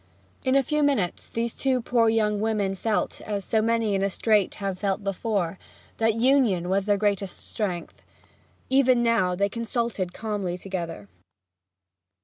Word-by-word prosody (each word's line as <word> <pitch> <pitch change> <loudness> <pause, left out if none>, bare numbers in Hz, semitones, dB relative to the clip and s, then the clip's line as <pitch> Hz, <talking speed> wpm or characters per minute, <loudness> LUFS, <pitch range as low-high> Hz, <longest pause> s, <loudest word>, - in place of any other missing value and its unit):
In 260 +1 +2
a 275 - +5
few 300 +4 0
minutes 270 -12 0
these 230 0 -2
two 265 -2 0
poor 230 -1 +2
young 210 -2 +1
women 210 -3 0
felt, 210 +2 -1
as 205 -2 -4
so 220 - +2
many 225 -1 +1
in 195 - +1
a 195 - +1
strait 210 0 +2
have 195 -2 -4
felt 200 0 -1
before, 195 -2 -1 0.4
that 225 -1 +2
union 230 -8 +3
was 195 +1 +1
their 205 -1 +2
greatest 200 -2 -1
strength, 185 -6 -4 0.7
even 260 -2 +4
now; 225 -6 +2
and 180 - -5
they 200 - +3
consulted 230 -3 -2
calmly 200 -4 -3
together. 170 - -5
210 Hz, 155 wpm, -25 LUFS, 195-230 Hz, 0.7 s, a